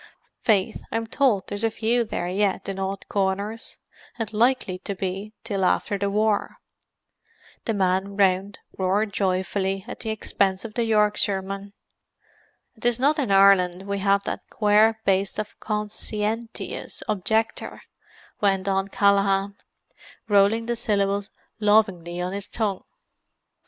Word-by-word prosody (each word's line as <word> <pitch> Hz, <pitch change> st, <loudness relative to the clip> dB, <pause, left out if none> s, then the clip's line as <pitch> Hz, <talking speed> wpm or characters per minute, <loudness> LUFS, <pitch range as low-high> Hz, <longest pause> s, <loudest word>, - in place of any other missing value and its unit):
Faith, 215 Hz, -1 st, +1 dB
I'm 225 Hz, 0 st, -1 dB
towld 225 Hz, -5 st, +1 dB
there's 205 Hz, +2 st, -5 dB
a 225 Hz, -, +3 dB
few 230 Hz, +2 st, +1 dB
there 195 Hz, -5 st, -3 dB
yet 195 Hz, +2 st, 0 dB
in 195 Hz, -1 st, -4 dB
odd 195 Hz, 0 st, -4 dB
corners—and 205 Hz, +2 st, -4 dB
likely 220 Hz, -4 st, +1 dB
to 200 Hz, -, -5 dB
be 195 Hz, +3 st, -4 dB
till 200 Hz, -4 st, -2 dB
after 195 Hz, +2 st, +1 dB
the 200 Hz, 0 st, 0 dB
war." 210 Hz, +1 st, +1 dB, 1.1 s
The 225 Hz, -, 0 dB
men 190 Hz, +1 st, 0 dB
round 195 Hz, 0 st, +2 dB, 0.2 s
roared 200 Hz, +3 st, +1 dB
joyfully, 190 Hz, 0 st, -1 dB
at -, -, -7 dB
the 220 Hz, -, -4 dB
expense 200 Hz, -2 st, 0 dB
of 220 Hz, -, -7 dB
the 235 Hz, 0 st, 0 dB
Yorkshireman. 200 Hz, -2 st, +1 dB, 1.0 s
"And 220 Hz, -, -23 dB
'tis 240 Hz, 0 st, +1 dB
not 290 Hz, +4 st, +3 dB
in 265 Hz, -7 st, 0 dB
Ireland 195 Hz, -2 st, +5 dB
we 200 Hz, 0 st, -3 dB
have 200 Hz, 0 st, +2 dB
that -, -, -3 dB
quare 215 Hz, +1 st, +3 dB
baste 195 Hz, -1 st, +1 dB
the 215 Hz, -, -2 dB
con 210 Hz, -1 st, -2 dB
sci 210 Hz, 0 st, -4 dB
en 225 Hz, +2 st, -1 dB
tious -, -, -5 dB
objector," 220 Hz, +3 st, -1 dB, 0.6 s
went 195 Hz, -1 st, +2 dB
on 195 Hz, 0 st, +1 dB
Callaghan, 200 Hz, 0 st, +2 dB, 0.7 s
rolling 205 Hz, +2 st, +4 dB
the 240 Hz, 0 st, -1 dB
syllables 200 Hz, -2 st, 0 dB, 0.3 s
lovingly 195 Hz, -5 st, +2 dB
on 180 Hz, +1 st, -2 dB
his 200 Hz, -1 st, -5 dB
tongue. 205 Hz, -4 st, -2 dB
200 Hz, 140 wpm, -24 LUFS, 195-220 Hz, 1.1 s, Ireland